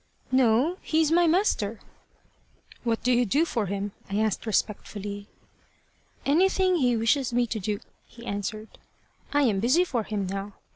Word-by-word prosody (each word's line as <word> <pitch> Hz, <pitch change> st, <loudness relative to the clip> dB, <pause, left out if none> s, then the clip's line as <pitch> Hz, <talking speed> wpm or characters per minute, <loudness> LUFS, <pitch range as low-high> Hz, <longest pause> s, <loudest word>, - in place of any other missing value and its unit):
"No. 260 Hz, +7 st, +3 dB
He's 315 Hz, -1 st, +1 dB
my 345 Hz, +1 st, +4 dB
master." 315 Hz, -, +1 dB, 1.0 s
"What 230 Hz, -2 st, -1 dB
do 250 Hz, -, +2 dB
you 245 Hz, 0 st, +4 dB
do 285 Hz, -, +2 dB
for 225 Hz, -10 st, -2 dB
him?" 200 Hz, +1 st, -3 dB, 0.2 s
I 200 Hz, -, -1 dB
asked 220 Hz, +1 st, 0 dB
respectfully. 205 Hz, -1 st, -2 dB, 1.0 s
"Anything 370 Hz, +4 st, +3 dB
he 245 Hz, -6 st, +2 dB
wishes 240 Hz, +3 st, +1 dB
me 240 Hz, 0 st, +2 dB
to 225 Hz, -1 st, -3 dB
do," 205 Hz, +1 st, -2 dB, 0.3 s
he 235 Hz, 0 st, -13 dB
answered. 210 Hz, +1 st, -5 dB, 0.5 s
"I 290 Hz, 0 st, +3 dB
am 215 Hz, -7 st, +2 dB
busy 255 Hz, -, +4 dB
for 250 Hz, -9 st, -1 dB
him 210 Hz, -2 st, -3 dB
now. 195 Hz, +2 st, -5 dB
230 Hz, 150 wpm, -26 LUFS, 205-285 Hz, 1.0 s, my